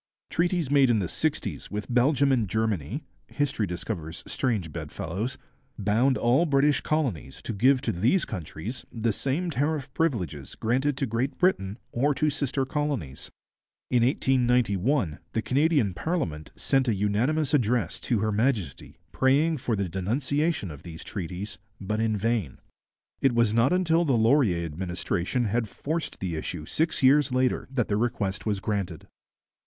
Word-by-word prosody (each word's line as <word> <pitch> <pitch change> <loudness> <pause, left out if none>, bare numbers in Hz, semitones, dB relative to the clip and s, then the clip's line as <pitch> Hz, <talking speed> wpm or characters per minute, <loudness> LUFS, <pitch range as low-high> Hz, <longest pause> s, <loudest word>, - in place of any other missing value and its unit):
Treaties 170 -4 +1
made 140 -3 +5
in 115 - +4
the 95 -4 0
sixties - - -2
with 105 0 -4
Belgium 140 +3 +4
and 115 -7 +1
Germany 110 - -1 0.2
history 135 -8 -1
discovers 85 -2 -5
strange 105 -11 -1
bedfellows 100 - -4 0.4
bound 115 +6 +2
all 130 +9 +3
British 145 0 +3
colonies 125 - -2
to - - -3
give 130 +6 +4
to - - 0
these 120 - +2
countries 90 - -6
the 115 -1 0
same 155 - -1
tariff 145 -1 -1
privileges 90 - -2
granted 130 +5 0
to 140 - 0
Great 120 +4 -2
Britain 110 - +1
or 140 +4 +1
to 150 +1 +1
sister 140 -2 -1
colonies. 135 - -3 0.6
In 125 -2 +4
1891 125 - +2
the 110 - +1
Canadian 140 - +2
parliament 90 - -2
sent 135 -1 +1
a 115 - +2
unanimous 120 +10 +1
address 120 - +1
to 115 -5 0
Her 110 0 +1
Majesty 110 - -1
praying 145 +5 +3
for 120 -3 -1
the 100 -2 -1
denunciation 125 - -1
of 70 - -10
these 80 -2 -9
treaties, 95 +2 -6 0.2
but 105 +2 -2
in 110 -1 +1
vain. 110 - -1 0.6
It 135 -3 +3
was 115 -2 +3
not 115 +3 +3
until 175 -2 +3
the 135 -7 +2
Laurier 110 - +3
administration 90 +7 -2
had 110 +1 0
forced 160 +8 -4
the 90 -4 -3
issue 80 0 -5
six 160 - -1
years 140 +1 +5
later 130 0 +1
that 130 -4 0
the 100 - 0
request 105 -3 -1
was 105 -2 0
granted. 95 -5 -3
120 Hz, 150 wpm, -27 LUFS, 100-140 Hz, 0.6 s, made